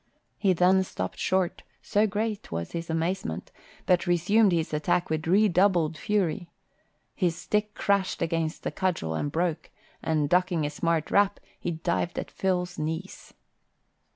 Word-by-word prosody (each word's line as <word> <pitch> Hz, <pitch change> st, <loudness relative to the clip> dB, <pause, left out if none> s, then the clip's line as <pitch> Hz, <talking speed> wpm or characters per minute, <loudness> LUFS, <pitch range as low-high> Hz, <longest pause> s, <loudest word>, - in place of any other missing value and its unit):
He 195 Hz, -3 st, +3 dB
then 185 Hz, +2 st, +4 dB
stopped 95 Hz, -, -5 dB
short, 185 Hz, -2 st, 0 dB, 0.2 s
so 210 Hz, +1 st, +2 dB
great 210 Hz, +1 st, -3 dB
was 85 Hz, 0 st, -4 dB
his 170 Hz, 0 st, -5 dB
amazement, 165 Hz, -, -2 dB, 0.3 s
but 180 Hz, 0 st, +2 dB
resumed 190 Hz, +5 st, +4 dB
his 165 Hz, -2 st, 0 dB
attack 155 Hz, +3 st, 0 dB
with 155 Hz, 0 st, -1 dB
redoubled 180 Hz, -4 st, +3 dB
fury. 180 Hz, 0 st, -1 dB, 0.6 s
His 175 Hz, -4 st, 0 dB
stick 210 Hz, +4 st, -1 dB
crashed 200 Hz, -2 st, +1 dB
against 165 Hz, 0 st, -1 dB
the -, -, -2 dB
cudgel 175 Hz, -, -1 dB
and 145 Hz, -, -2 dB
broke, 165 Hz, 0 st, -1 dB, 0.3 s
and 155 Hz, -2 st, +1 dB
ducking 175 Hz, -1 st, +2 dB
a 145 Hz, -, -2 dB
smart 165 Hz, +1 st, -1 dB
rap, 205 Hz, 0 st, +3 dB, 0.2 s
he -, -, -3 dB
dived 170 Hz, +1 st, -2 dB
at -, -, -4 dB
Phil's 180 Hz, -1 st, -1 dB
knees. 160 Hz, +5 st, -5 dB
175 Hz, 145 wpm, -27 LUFS, 160-190 Hz, 0.6 s, then